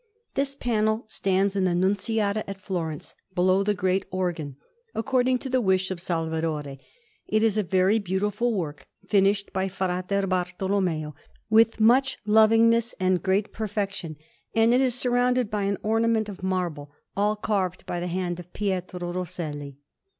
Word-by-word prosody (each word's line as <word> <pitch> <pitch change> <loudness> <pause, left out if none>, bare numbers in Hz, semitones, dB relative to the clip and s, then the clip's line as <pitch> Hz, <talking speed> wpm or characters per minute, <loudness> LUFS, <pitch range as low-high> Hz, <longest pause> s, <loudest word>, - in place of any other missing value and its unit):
This 275 0 -1
panel 220 -3 0
stands 195 -2 0
in 195 -1 +2
the 175 -1 +1
Nunziata 205 +3 +1
at 195 0 -6
Florence, 170 -6 -4 0.2
below 185 +2 +3
the 205 +1 +1
great 185 +1 0
organ, 175 -7 -3 0.4
according 255 +2 +2
to 265 - -6
the 255 -1 +1
wish 190 -2 +1
of 185 - -4
Salvadore; 160 -5 -2 0.5
it 215 +1 +2
is 220 -2 +3
a 215 - +2
very 190 +3 +2
beautiful 205 +4 0
work, 160 -9 -4 0.2
finished 200 0 +2
by 190 0 0
Fra 185 -1 -2
Bartolommeo 185 -4 -1 0.4
with 225 +1 +5
much 255 +5 +4
lovingness 225 +2 +4
and 185 -1 +2
great 195 +2 0
perfection; 200 -6 -3 0.4
and 225 +1 +4
it 255 - +4
is 255 -3 +1
surrounded 250 -2 +1
by 205 -2 0
an 200 0 0
ornament 225 0 +1
of 195 -2 -9
marble, 175 -6 -2 0.2
all 210 +1 +2
carved 195 -4 -2
by 175 - -3
the 175 - -3
hand 180 0 -2
of 180 0 -11
Pietro 180 -3 -3
Rosselli. 155 -6 -5
195 Hz, 150 wpm, -26 LUFS, 180-220 Hz, 0.5 s, with